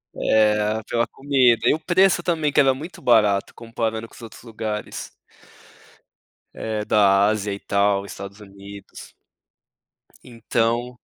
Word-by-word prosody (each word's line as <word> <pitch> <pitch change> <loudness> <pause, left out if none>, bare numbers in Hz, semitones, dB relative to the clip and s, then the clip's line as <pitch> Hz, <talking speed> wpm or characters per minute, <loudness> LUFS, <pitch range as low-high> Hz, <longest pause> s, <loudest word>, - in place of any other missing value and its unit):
É, 105 0 +1
pela 115 0 +1
comida. 130 -4 +2
E - - +4
o 155 - -3
preço 175 +1 +2
também, 160 -4 0
que 145 - +2
era 135 -2 +4
muito 155 +7 -10
barato 105 -5 +2
comparando 115 -1 -4
com - - -20
os - - -14
outros 115 -2 -12
lugares 110 -2 -6 1.5
eh, 110 -1 -4
da 100 -1 +4
Ásia 105 -2 -2
e 100 - -7
tal, 100 0 0
Estados 100 +1 -10
Unidos. 100 -1 -13 1.1
Então 120 +1 -2
110 Hz, 130 wpm, -22 LUFS, 105-125 Hz, 1.5 s, E